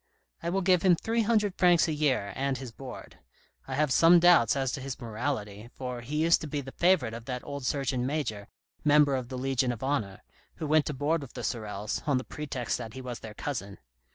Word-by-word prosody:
I 170 - -2
will 195 +2 0
give 180 -1 +4
him 180 -2 +5
three 225 +7 0
hundred 210 -3 +2
francs 175 -2 +5
a 160 - -1
year 130 -10 0
and 135 0 -1
his 130 -3 -7
board. 130 +1 -10 0.5
I 130 - -3
have 150 0 +1
some 170 +4 +7
doubts 170 -10 +5
as 135 -2 0
to 135 - -4
his 135 0 -6
morality, 115 -3 -4
for 125 -2 -5
he 150 +6 -1
used 170 +1 +4
to 155 - -5
be 145 0 -3
the 135 -1 -7
favourite 170 -11 +2
of 115 0 -8
that 125 -1 -4
old 140 -2 -5
Surgeon 135 -3 0
Major, 120 -9 -3 0.4
Member 150 -1 +5
of 125 -2 -4
the 130 - -5
Legion 130 -1 0
of 120 0 -6
Honour, 120 -9 -2 0.3
who 160 - -5
went 155 0 +3
to 150 - -3
board 150 +4 0
with 135 -3 -10
the - - -6
Sorels, 105 -2 -3
on 140 -3 +3
the 130 - -2
pretext 135 -6 -4
that 115 -2 -7
he - - -6
was 125 -2 -6
their 110 -1 -9
cousin. 100 -9 -5
135 Hz, 225 wpm, -28 LUFS, 120-155 Hz, 0.5 s, some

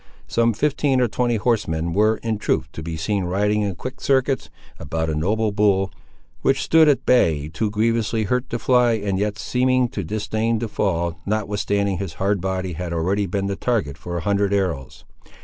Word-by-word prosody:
Some 115 0 +2
fifteen 140 +2 +1
or 125 - +3
twenty 120 +1 0
horsemen 85 -8 0
were, 110 +3 +3
in 110 -2 -1
truth, 75 - 0
to 80 - -7
be 80 0 -5
seen 95 +3 -1
riding, 105 +4 +1
in 100 -3 -1
quick 130 - -7
circuits, 135 0 +1 0.3
about 80 +2 -2
a - - -2
noble 105 +8 0
bull, 100 -2 +2 0.5
which 135 0 +2
stood 160 -1 +5
at 140 -4 +1
bay, 80 - +3
too 80 +7 -1
grievously 110 +1 0
hurt 125 +5 -1
to 120 - -2
fly, 125 0 +3
and 100 -3 -1
yet 105 0 -1
seeming 130 +2 +1
to 100 - -4
disdain 110 +4 -1
to 115 +1 -3
fall, 85 -5 -1
notwithstanding 100 -2 0
his 95 -5 -4
hardy 100 +3 0
body 95 0 -2
had 85 +1 -4
already 95 +5 0
been 100 +2 -2
the 100 0 -2
target 100 - -1
for 85 +4 -5
a - - -3
hundred 100 +2 +1
arrows. 85 -10 -2
100 Hz, 185 wpm, -22 LUFS, 90-115 Hz, 0.5 s, stood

